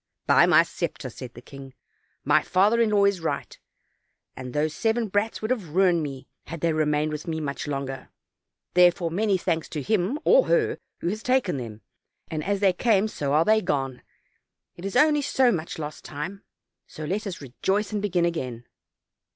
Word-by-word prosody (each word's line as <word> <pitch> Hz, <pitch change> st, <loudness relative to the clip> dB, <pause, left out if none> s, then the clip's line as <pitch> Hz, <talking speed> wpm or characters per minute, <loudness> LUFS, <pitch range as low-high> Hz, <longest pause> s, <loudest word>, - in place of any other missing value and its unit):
"By -, -, +5 dB
my -, -, +6 dB
scepter," -, -, -5 dB
said 125 Hz, -1 st, -10 dB
the 120 Hz, -, -12 dB
king, 135 Hz, -1 st, -12 dB, 0.5 s
"my 150 Hz, +2 st, +4 dB
father 205 Hz, +8 st, +3 dB
in 225 Hz, -, +3 dB
law 205 Hz, -1 st, +4 dB
is 200 Hz, -2 st, +2 dB
right; 165 Hz, -, -3 dB, 0.8 s
and 125 Hz, -1 st, -7 dB
those 150 Hz, +3 st, 0 dB
seven 225 Hz, +2 st, 0 dB
brats 205 Hz, +3 st, -1 dB
would 215 Hz, -, -1 dB
have 185 Hz, -11 st, -3 dB
ruined 180 Hz, -3 st, +4 dB
me, 135 Hz, -3 st, -6 dB, 0.2 s
had 165 Hz, -1 st, -7 dB
they 165 Hz, -1 st, +1 dB
remained 155 Hz, 0 st, +1 dB
with 150 Hz, +1 st, -6 dB
me 160 Hz, -1 st, -2 dB
much 140 Hz, -2 st, -4 dB
longer; 135 Hz, -2 st, -4 dB, 0.6 s
therefore, 175 Hz, -1 st, +4 dB
many 200 Hz, +2 st, +1 dB
thanks 165 Hz, -3 st, -2 dB
to 155 Hz, -, -4 dB
him 215 Hz, -, 0 dB
or -, -, +5 dB
her -, -, +1 dB, 0.2 s
who 170 Hz, -, -1 dB
has 215 Hz, +3 st, -4 dB
taken 250 Hz, -, +1 dB
them; 110 Hz, -4 st, -7 dB, 0.5 s
as 190 Hz, +6 st, -2 dB
they 195 Hz, -2 st, +4 dB
came 215 Hz, +1 st, +2 dB
so 145 Hz, -9 st, -3 dB
are 155 Hz, +2 st, +4 dB
they 220 Hz, 0 st, +4 dB
gone; 135 Hz, -8 st, -2 dB, 0.7 s
it 175 Hz, -, -9 dB
is 195 Hz, -, -4 dB
only 300 Hz, -1 st, +4 dB
so 265 Hz, -3 st, +3 dB
much 170 Hz, -3 st, -4 dB
lost 150 Hz, -1 st, -6 dB
time; 165 Hz, +7 st, -6 dB, 0.5 s
so 155 Hz, -, -8 dB
let 200 Hz, +6 st, -2 dB
us 185 Hz, -, -5 dB
rejoice 190 Hz, -, -2 dB
and 210 Hz, -, -1 dB
begin 180 Hz, -4 st, +1 dB
again." 130 Hz, -8 st, -3 dB
175 Hz, 185 wpm, -25 LUFS, 150-210 Hz, 0.8 s, my